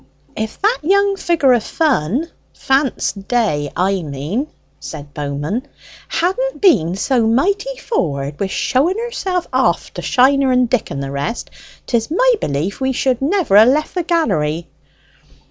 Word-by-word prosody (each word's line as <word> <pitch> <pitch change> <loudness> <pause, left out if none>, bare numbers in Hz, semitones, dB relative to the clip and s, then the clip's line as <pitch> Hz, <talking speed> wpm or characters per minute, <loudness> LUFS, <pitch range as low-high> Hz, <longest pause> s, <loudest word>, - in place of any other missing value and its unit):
"If 220 0 -4
that 440 +4 +2
young 400 +4 +2
figure 325 -8 +2
of 235 -3 +1
fun 275 - 0 0.3
Fance 270 -1 +1
Day, 195 - -1
I 190 +1 +1
mean," 155 - -3 0.3
said 145 -2 -9
Bowman, 150 - -3 0.4
"hadn't 450 +9 -1
been 185 - +3
so 230 +3 +1
mighty 400 - 0
forward 145 - -2
wi' 200 - 0
showing 280 - 0
herself 390 -7 -2
off - - +1
to - - -6
Shiner 270 +1 +3
and 250 -1 +3
Dick 245 -1 0
and 140 0 -4
the 135 - -5
rest, 140 +11 -4 0.3
'tis 230 -2 -1
my - - +3
belief 155 - -2
we 265 0 +1
should 255 -1 0
never 295 - +3
ha' - - +3
left 295 +4 +1
the 360 - 0
gallery." 170 - 0
250 Hz, 145 wpm, -18 LUFS, -, 0.4 s, been